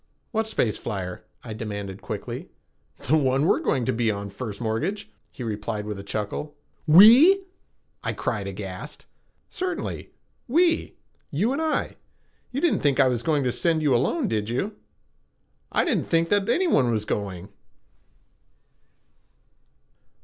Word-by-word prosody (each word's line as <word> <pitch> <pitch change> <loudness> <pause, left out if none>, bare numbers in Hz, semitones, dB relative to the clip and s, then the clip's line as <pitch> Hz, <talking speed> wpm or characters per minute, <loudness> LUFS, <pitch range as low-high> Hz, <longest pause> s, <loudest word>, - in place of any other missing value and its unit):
"What 220 -2 0
space 115 - 0
flyer?" 95 -5 -5 0.2
I 115 - -6
demanded 100 -3 -6
quickly. - - -6 0.6
"The 155 - +4
one 135 -2 +2
we - - +4
are - - -3
going 125 -3 0
to - - +1
be 115 0 +1
on, 100 -1 -3
First 105 -1 -6
Mortgage," 135 - -2 0.2
he 125 - -8
replied 105 -1 -3
with 105 -1 -4
a - - -5
slight - - -15
chuckle. 110 +8 -4 0.3
"We?" 240 - +8 0.6
I - - -1
cried, - - -2
aghast. - - -7 0.4
"Certainly. 365 0 -4 0.4
We. 335 +6 +2 0.3
You 200 - 0
and 290 - -2
I. 315 -1 -1 0.5
You 270 +3 -2
didn't 345 - +2
think 140 -2 +1
I 135 - +6
was 125 -2 0
going 150 0 +1
to 125 - +1
send 160 +3 0
you 145 -3 +3
alone, 215 - +1
did 105 - -1
you?" 195 - -2 1.0
"I - - +2
didn't - - -1
know 165 0 +4
that 200 +4 +1
anyone 240 - +3
was 110 -2 -1
going." 100 -3 -4
135 Hz, 150 wpm, -25 LUFS, -, 1.0 s, We